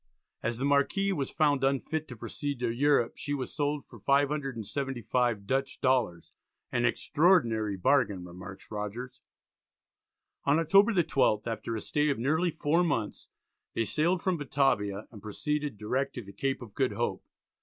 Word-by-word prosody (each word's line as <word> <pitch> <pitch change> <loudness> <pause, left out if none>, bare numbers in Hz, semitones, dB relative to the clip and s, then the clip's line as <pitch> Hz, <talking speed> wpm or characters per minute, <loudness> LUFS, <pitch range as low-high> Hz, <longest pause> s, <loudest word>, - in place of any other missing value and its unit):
As 120 +1 -2
the 135 - -1
Marquis 145 +8 +2
was 140 -6 -2
found 145 -4 +2
unfit 140 +3 0
to 125 - -8
proceed 140 +4 -4
to 120 -2 0
Europe, 135 -1 +2
she 145 -1 -2
was 130 -3 -5
sold 145 -1 -1
for - - -14
575 135 -5 0
Dutch 135 +5 -1
dollars, 120 -10 0 0.4
"an 120 0 +1
extraordinary 120 - +2
bargain," 110 -5 +2
remarks 90 +2 -10
Rogers. 105 +4 -5 1.2
On 140 +2 +3
October 195 +7 +5
the 180 -5 +3
12th, 130 -8 +2
after 115 0 -3
a 110 - -3
stay 150 0 +1
of 140 - 0
nearly 155 +9 +1
four 160 +2 +1
months, 115 -11 -2 0.5
they 115 - +1
sailed 170 - +1
from 185 -2 +1
Batavia 120 -8 0
and 105 -4 -12
proceeded 145 +5 -3
direct 130 +6 -2
to 125 - -5
the 100 0 -12
Cape 135 +5 -2
of 110 -4 -12
Good 130 -5 0
Hope. 120 +3 -2
135 Hz, 155 wpm, -29 LUFS, 115-145 Hz, 1.2 s, October